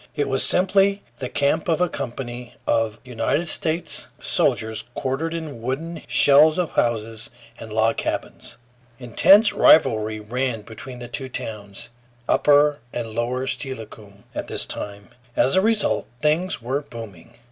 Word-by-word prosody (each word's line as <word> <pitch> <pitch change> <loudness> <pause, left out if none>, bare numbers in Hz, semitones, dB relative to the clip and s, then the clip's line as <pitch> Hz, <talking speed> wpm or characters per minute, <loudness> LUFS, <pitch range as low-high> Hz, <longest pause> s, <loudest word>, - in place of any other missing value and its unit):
It 145 -2 0
was 135 -1 0
simply 195 +2 +3 0.2
the 130 -2 -4
camp 145 +3 0
of 165 - +2
a 180 - +3
company 125 -4 -6
of 115 -1 0
United 130 +7 -1
States 160 +2 -1
soldiers, 110 0 0
quartered 145 +5 -2
in 155 -8 -6
wooden 155 +7 -4
shells 150 +3 +6
of 180 -3 -1
houses 115 -1 -1 0.3
and 110 - -9
log 110 +1 +1
cabins. 120 - -4 0.4
Intense 195 - +5
rivalry 110 -7 +4
ran 115 +1 -3
between 120 +4 -10
the 120 0 -8
two 130 +2 -3
towns, 105 -1 -6 0.4
upper 145 0 +4
and 115 -2 -5
lower 120 +3 -1
Steilacoom, 110 -7 -6
at - - -5
this - - -2
time. 100 0 -6 0.3
As 135 - +3
a 190 - +5
result 220 0 +1
things 155 -1 +1
were 135 +4 -1
booming. 115 - -11
130 Hz, 140 wpm, -22 LUFS, 115-155 Hz, 0.4 s, shells